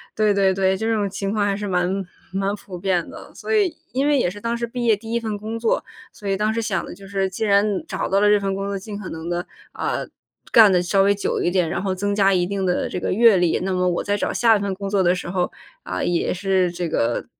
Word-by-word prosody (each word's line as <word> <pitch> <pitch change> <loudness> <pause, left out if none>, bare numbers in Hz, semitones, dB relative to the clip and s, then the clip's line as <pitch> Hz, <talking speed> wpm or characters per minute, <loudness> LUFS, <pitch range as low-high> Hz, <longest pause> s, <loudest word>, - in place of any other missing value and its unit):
对 215 -1 +3
对 195 -1 +3
对， 190 0 +2
这 220 +4 -1
种 210 -2 0
情 195 0 -3
况 210 -1 +1
还 200 -1 +1
是 205 +1 -4
蛮 180 -2 +1 0.5
蛮 195 +1 0
普 190 -3 -10
遍 180 -2 0
的。 - - -11
所 - - -4
以 390 -7 +2 0.2
因 270 +3 +1
为 295 -1 +4
也 245 - +2
是 205 +3 -9
当 235 +1 -1
时 235 - -2
毕 240 +1 -5
业 225 -2 +5
第 225 +2 -9
1 235 - +2
份 220 -2 -3
工 220 +2 -5
作， 225 -1 +1 0.3
所 210 -3 -9
以 195 - +1
当 210 +2 +1
时 225 - -2
想 210 -5 -1
的 - - -8
就 195 +1 -13
是 195 -1 -1
既 190 +4 -4
然 200 -1 +2
找 - - -3
到 195 - +3
了 210 - +4
这 210 0 +5
份 195 -1 -2
工 195 0 -3
作， 200 0 -2
尽 205 +1 -7
可 200 - -7
能 160 +1 -7
的， 175 +1 -2 0.2
啊， - - -2 0.5
干 220 -3 +8
得 180 -1 +3
稍 195 +2 +2
微 200 +1 +4
久 200 - -2
一 - - +2
点， 180 -2 +1
然 175 - -2
后 190 -1 -1
增 205 +2 -1
加 200 -1 +4
一 180 -1 +2
定 195 +1 -2
的 180 -1 0
这 - - -4
个 - - -2
阅 225 0 +6
历。 175 -2 +2
那 190 0 -1
么 180 0 +1
我 175 - -1
在 205 - 0
找 205 - -1
下 230 -2 +4
一 - - +1
份 200 -1 -1
工 200 +1 -5
作 200 -1 +2
的 180 0 +3
时 180 - -6
候 180 0 -1 0.3
啊， - - -3
也 175 -1 0
是 185 -1 +1
这 175 0 -3
个， 120 -7 0
195 Hz, 295 characters per minute, -22 LUFS, 185-210 Hz, 0.5 s, 干